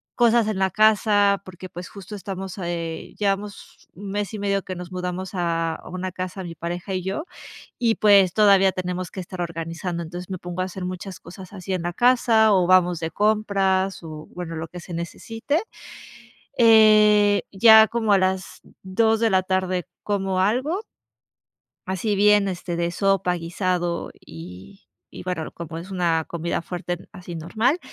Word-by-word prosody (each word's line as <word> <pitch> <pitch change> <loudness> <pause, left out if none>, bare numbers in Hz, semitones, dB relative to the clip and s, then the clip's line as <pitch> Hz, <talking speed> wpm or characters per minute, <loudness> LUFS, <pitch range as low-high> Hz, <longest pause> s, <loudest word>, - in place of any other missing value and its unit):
cosas 235 -2 +4
en 195 -3 -2
la 190 - +2
casa 205 -1 +3
porque, 185 0 -10
pues 175 +1 -8
justo 200 0 -11
estamos 190 -1 -6
a 175 - -3
eh, 165 -1 -5
llevamos 200 0 -3
mes 200 +1 -4
y 215 - -5
medio 200 -1 0
que 185 - -6
nos 180 0 -8
mudamos 180 +1 -4
a 165 -2 -1
una 185 +1 -4
casa 185 +1 -5
mi 170 -1 -7
pareja 175 +3 -5
y 185 - -1
yo, 195 +11 -3 0.6
y 230 -2 +2
pues 200 -4 +5
todavía 195 -2 +5
tenemos 180 -1 -4
que - - -11
estar 180 0 -8
organizando. 170 +1 -4
Entonces, 175 +3 -8
me 185 - -4
pongo 175 +1 -6
a - - -1
hacer 185 0 -7
muchas 185 +1 -6
cosas 185 +2 -12
así 190 -1 -6
en 180 - -2
la 175 0 -2
casa 235 -2 +4
o 180 -2 +3
vamos 180 -2 +4
de 160 -1 -3
compras 195 -3 +1
o 155 -1 -8
bueno, 175 -2 -6
lo 160 0 -5
que 180 - -9
se 170 +1 -9
necesite. 225 - -3 1.0
Eh, 215 -3 +6
ya 220 +2 +8
como 225 -3 +1
a - - +6
las 190 0 -1 0.2
2 220 +4 +2
de 225 - +3
la 185 -1 +3
tarde 185 -1 -1 0.2
como 195 -2 -1
algo 260 - +1 1.1
así 190 +3 -1
bien, 205 0 +4
este, 175 -2 -4
de 170 0 -1
sopa, 195 -1 +1
guisado 175 0 -2
y 90 - -12 0.3
y - - -9
bueno, 180 -4 -4
como 165 -1 -7
es 180 - -10
una 170 -4 +1
comida 170 0 -3
fuerte 175 +1 -6
así 180 -1 -9
normal. 220 - 0
185 Hz, 170 wpm, -23 LUFS, 175-205 Hz, 1.1 s, ya